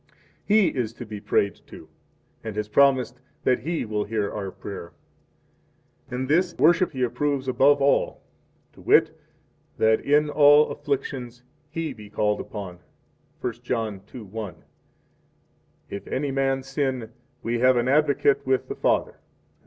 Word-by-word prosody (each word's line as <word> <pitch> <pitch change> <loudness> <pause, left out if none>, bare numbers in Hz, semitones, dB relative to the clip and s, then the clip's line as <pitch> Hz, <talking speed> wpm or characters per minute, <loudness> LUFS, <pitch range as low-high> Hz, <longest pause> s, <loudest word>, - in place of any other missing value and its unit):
3 210 - +3
He 215 -4 +5
is 115 -4 -3
to 120 - -8
be 105 -2 -8
prayed 100 -1 0
to, - - -12 0.6
and 110 -2 -5
has 105 0 -2
promised 130 0 +3 0.2
that 125 - +2
He 160 +7 -2
will 105 -1 -1
hear 105 -1 -2
our 100 -2 -4
prayer; 95 -2 -9 1.2
and 130 +1 -3
this 175 +4 +2
worship 175 +2 +4
He 130 -1 -1
approves 130 +2 -1
above 135 +3 +4
all, 140 - +1 0.5
to - - -16
wit, - - +4 0.6
that 110 0 +3
in 150 +1 +3
all 145 0 +6
afflictions 130 -3 -4 0.3
He 165 -1 -4
be 105 -1 -12
called 105 0 0
upon, 95 -5 -8 0.6
1 120 - -2
John 115 -5 -2
2:1: 110 -7 -10
4 105 -6 -5 1.4
If 100 0 -6
any 140 +1 -2
man 135 0 0
sin, 130 -5 -2 0.3
we 120 +1 -1
have 130 +1 +4
an 120 +1 +1
Advocate 140 0 +3
with 130 0 0
the - - -4
Father, - - +1
etc. - - -37
125 Hz, 150 wpm, -25 LUFS, 110-140 Hz, 1.4 s, all